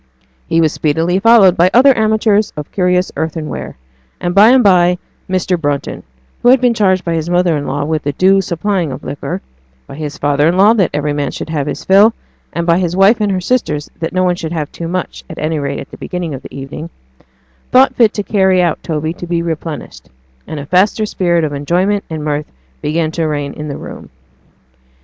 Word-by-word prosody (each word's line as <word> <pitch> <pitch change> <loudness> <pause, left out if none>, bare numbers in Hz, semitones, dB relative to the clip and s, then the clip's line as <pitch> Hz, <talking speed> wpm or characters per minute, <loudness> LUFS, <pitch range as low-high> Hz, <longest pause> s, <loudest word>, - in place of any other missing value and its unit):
He 165 - +2
was 160 -1 +2
speedily 165 +4 0
followed 210 -4 +6
by 180 0 +4
other 265 +2 +6
amateurs 215 -1 +2
of 150 - -6
curious 180 -1 +1
earthenware; 160 - -4 0.4
and 175 - -2
by 205 +4 +7
and 255 0 +5
by 180 -3 +4 0.3
Mr. 185 -2 0
Brunton 145 -2 -2 0.4
(who 245 - +4
had 260 +1 +6
been 245 -1 +2
charged 190 -4 +1
by 170 - -1
his 165 0 -2
mother 175 -2 +2
in 145 -1 -3
law 145 +2 -2
with 155 0 -1
the 145 0 -3
due 190 +5 +3
supplying 180 -2 -2
of - - -7
liquor - - -5 0.4
by - - -11
his 150 +1 -6
father 145 0 +1
in 175 +2 +1
law 205 +4 +6
that 195 -7 +2
every 150 0 -1
man 145 -2 -2
should - - -7
have 145 -3 -2
his - - -5
fill, 205 +4 +5 0.4
and 170 - -3
by 170 +1 +3
his 175 -2 -1
wife 200 +4 +4
and 205 -1 +1
her 190 - 0
sisters 175 -8 -1
that 165 - -3
no 185 0 0
one 180 -1 +2
should 165 -2 -5
have 155 -3 -3
too 170 - -6
much, 180 +1 -4
at 160 - -9
any 155 0 -2
rate 140 0 -3
at - - -10
the - - -10
beginning 180 -4 -5
of 135 - -7
the - - -12
evening,) 145 +4 -7 0.8
thought 260 +2 +5
fit 230 -4 +4
to 205 - -2
carry 190 -3 +2
out 175 -3 +1
Toby 155 0 -3
to 175 - -8
be 170 0 -1
replenished; 160 -1 -6 0.4
and 155 - -5
a 140 - -6
faster 190 +7 +2
spirit 175 -5 0
of 150 -2 -2
enjoyment 180 +8 0
and 155 -2 -5
mirth 150 0 -3 0.3
began 155 +1 -1
to 165 -1 -1
reign 145 -2 -3
in 150 - -7
the 140 - -5
room. - - -10
170 Hz, 215 wpm, -15 LUFS, 155-195 Hz, 0.8 s, by